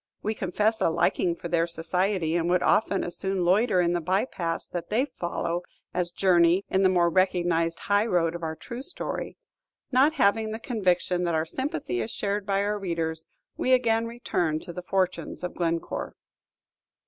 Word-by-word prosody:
We 215 - 0
confess 215 +3 0
a - - +4
liking 170 +1 +1
for 170 - -7
their 170 0 +1
society, 170 +1 -1
and 170 0 +1
would 180 0 +2
often 200 -2 +2
as 175 - -4
soon 190 -1 -1
loiter 190 +2 +3
in 175 -1 +2
the 175 - 0
by 185 +7 +1
paths 170 -8 -4
that 175 -1 -5
they 235 +6 +2
follow 175 -8 -3 0.3
as 180 -1 0
journey 175 0 +3
in 190 - +3
the 190 - +5
more 175 -2 +3
recognized 175 -2 +1
high 205 +2 +2
road 170 -5 +1
of 170 - -6
our 160 -1 -3
true 235 +9 -7
story. 280 - -5 0.5
Not 275 +4 +4
having 220 -5 +2
the - - -3
conviction 185 -6 0
that 170 -1 0
our 160 0 +1
sympathy 165 - -3
is 110 - -3
shared 200 0 -2
by 200 0 +1
our 205 0 -1
readers, 165 -4 -3 0.3
we 260 - +2
again 230 -2 +3
return 175 -9 -1
to 175 - -8
the 180 - -5
fortunes 185 0 -2
of 180 - -3
Glencore. 165 -1 -2
180 Hz, 185 wpm, -26 LUFS, 170-210 Hz, 0.5 s, the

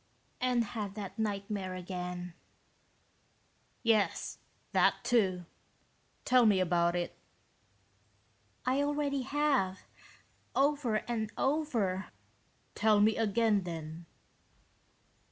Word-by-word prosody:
"And 250 -2 +2
had 205 -2 -5
that 205 0 -7
nightmare 200 -3 -2
again." 180 -1 -5 1.5
"Yes, 215 -6 +1 0.3
that, - - +4
too. 190 -7 +2 0.8
Tell 250 -3 +5
me 200 -3 +4
about 175 -1 +2
it." 175 -1 -2 1.5
"I 260 +2 +2
already 285 -1 0
have. 270 -9 +1 0.7
Over 275 -6 +2
and 220 -3 -2
over." 240 -11 0 0.7
"Tell 215 -1 +3
me 215 +1 +4
again, 220 -1 +2
then." 165 -1 -7
210 Hz, 85 wpm, -32 LUFS, 185-250 Hz, 1.5 s, Tell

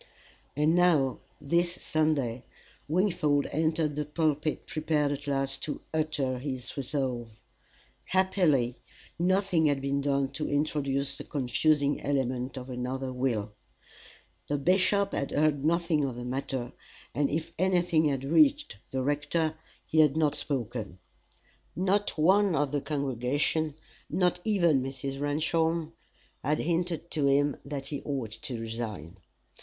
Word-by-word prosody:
And 150 +3 +3
now 165 -8 +3 0.2
this 170 +4 +1
Sunday, 145 -9 0 0.4
Wingfold 155 -4 +2
entered 155 0 +1
the 150 +1 -1
pulpit 150 0 -1
prepared 155 -2 0
at 145 0 -5
last 135 -1 0
to 150 - -4
utter 150 -5 0
his 130 -3 -5
resolve. 125 -5 -3 0.6
Happily 165 -10 +2 0.4
nothing 185 -2 +3
had 145 -2 +2
been 140 +1 -1
done 140 -1 +1
to 150 +2 -3
introduce 140 -1 0
the - - -5
confusing 145 +1 +1
element 130 -2 -1
of 125 0 -6
another 130 +1 -3
will. 120 -5 -1 1.0
The 145 - 0
bishop 190 +6 +2
had 140 - -2
heard 145 -2 +1
nothing 165 -1 +2
of 130 -3 -2
the 120 0 -6
matter, 130 -1 -3 0.4
and 140 +2 +1
if 160 +2 -3
anything 175 -3 +3
had 135 -3 0
reached 290 - +3
the 130 -1 -2
rector, 150 +3 0 0.3
he 160 - +1
had 155 -1 +5
not 155 -2 +3
spoken. 120 - -4 0.8
Not 195 +2 +1
one 190 +3 +4
of 145 -2 +1
the 145 -1 0
congregation, 140 +2 -1 0.3
not 180 -1 +1
even 170 -10 +3
Mrs. 135 +1 -4
Ramshorn, 160 +2 0 0.5
had 150 +3 +1
hinted 170 0 -1
to 145 -3 +1
him 140 +1 +3
that 140 -1 -6
he 145 - -4
ought 135 -7 -3
to 115 +2 -6
resign. 110 -6 -5
145 Hz, 130 wpm, -29 LUFS, 135-160 Hz, 1.0 s, had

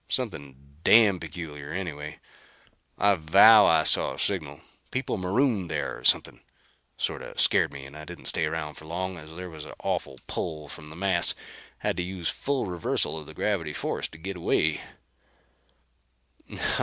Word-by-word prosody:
Something 70 +1 -4
damn 105 -5 +6
peculiar, 75 -3 -7
anyway. 75 -5 -5 0.8
I 100 +1 +4
vow 100 +7 +8
I 80 -1 +5
saw - - +3
a - - -10
signal. - - -1 0.3
People - - -2
marooned 100 - +1
there - - -2
or - - -16
something. - - +2 0.6
Sorta - - -4
scared - - +3
me 70 -1 -9
and 70 - -12
I 75 - -8
didn't 85 -1 -10
stay 80 - +2
around 75 -1 -4
for 80 - -11
long 90 +3 -3
as 80 0 -11
there 90 +1 -6
was 80 -2 -9
an - - -9
awful 65 - -2
pull 75 -2 -4
from 75 +1 -10
the 75 - -11
mass. 90 -1 +1 0.4
Had - - -2
to 90 - 0
use 90 -2 -3
full 140 -2 -1
reversal 90 -3 0
of 75 -2 -8
the 75 - -11
gravity 85 -8 -1
force 70 - -2
to 80 - -13
get 95 +3 -5
away." 80 -2 +1
80 Hz, 165 wpm, -27 LUFS, 75-95 Hz, 0.8 s, vow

